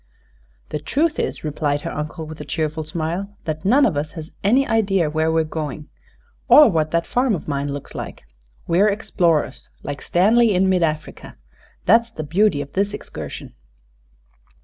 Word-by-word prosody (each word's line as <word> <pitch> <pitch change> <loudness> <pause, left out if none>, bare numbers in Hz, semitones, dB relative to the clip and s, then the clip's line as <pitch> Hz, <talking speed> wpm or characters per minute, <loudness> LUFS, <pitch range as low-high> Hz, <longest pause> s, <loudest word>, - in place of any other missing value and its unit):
"The - - -3
truth 295 - 0
is," - - -2
replied 145 -1 -1
her - - -5
uncle, 155 +2 -5
with 155 0 -9
a - - -4
cheerful 155 0 -2
smile, 170 +6 -4
"that 155 -1 -3
none 265 +8 +5
of 190 - +1
us 150 +2 -3
has 160 -2 -8
an 210 +6 +4
idea 195 - +1
where 160 +1 +1
we're 160 0 +2
going, 155 -1 -5 0.6
or 295 -6 +8
what 155 -3 +1
that 170 +1 0
farm 250 -3 +1
of 160 - -8
mine 140 -1 -2
looks 140 0 -7
like. - - -7 0.4
We're 190 +5 +3
explorers, 170 -9 0
like 145 0 -5
Stanley 215 +4 +3
in 190 +1 +3
mid 185 -1 +2
Africa. 155 -2 -3 0.5
That's 230 0 +4
the 160 -9 -6
beauty 170 0 +2
of 140 - -16
this 200 +1 0
excursion." - - -8
165 Hz, 170 wpm, -21 LUFS, 155-205 Hz, 0.6 s, or